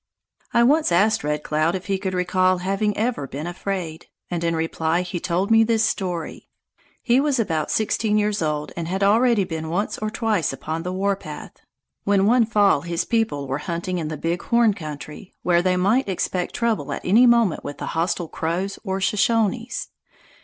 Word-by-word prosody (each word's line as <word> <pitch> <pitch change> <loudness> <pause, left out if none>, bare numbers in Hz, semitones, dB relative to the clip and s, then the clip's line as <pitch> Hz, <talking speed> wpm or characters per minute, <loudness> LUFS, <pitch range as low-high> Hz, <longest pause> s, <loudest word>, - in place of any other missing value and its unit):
I 235 - +4
once 295 - +3
asked 200 +3 +3
Red 150 0 -2
Cloud 155 +3 0
if 185 - -5
he 195 -1 -1
could 190 -1 -3
recall 185 +1 +2
having 195 +3 -1
ever 220 - -1
been 145 +4 -6
afraid, 175 -2 -4 0.2
and 170 -1 -2
in 165 0 +1
reply 160 +1 0
he 180 -1 -4
told 180 +4 -1
me 225 0 +6
this 225 0 +2
story. 180 -6 -3 0.5
He 245 +1 +3
was 285 -1 +1
about 160 -8 -1
sixteen 215 0 +1
years 210 -1 0
old 150 -1 -2
and 170 -1 -4
had 190 +3 -1
already 225 +1 +4
been 160 -3 -5
once 190 +6 -2
or 215 - -2
twice 215 - 0
upon 155 +4 -4
the 180 +2 -4
warpath, 195 +1 -3 0.5
when 200 -1 +3
one 230 +1 +4
fall 205 -9 +3
his 170 0 -2
people 225 - 0
were 135 +2 -2
hunting 175 +2 -2
in 160 - -3
the 155 0 -4
Big 170 +3 -2
Horn 235 -2 +3
country, 155 +2 -9
where 175 -1 +3
they 180 0 +1
might 205 +6 +2
expect 180 -1 -2
trouble 230 -2 -1
at - - -5
any 225 +7 +6
moment 235 -7 +3
with 145 - -6
the - - -5
hostile 170 +1 -1
Crows 175 +6 -3
or 190 -1 -2
Shoshones. 225 - 0
185 Hz, 185 wpm, -22 LUFS, 165-215 Hz, 0.5 s, me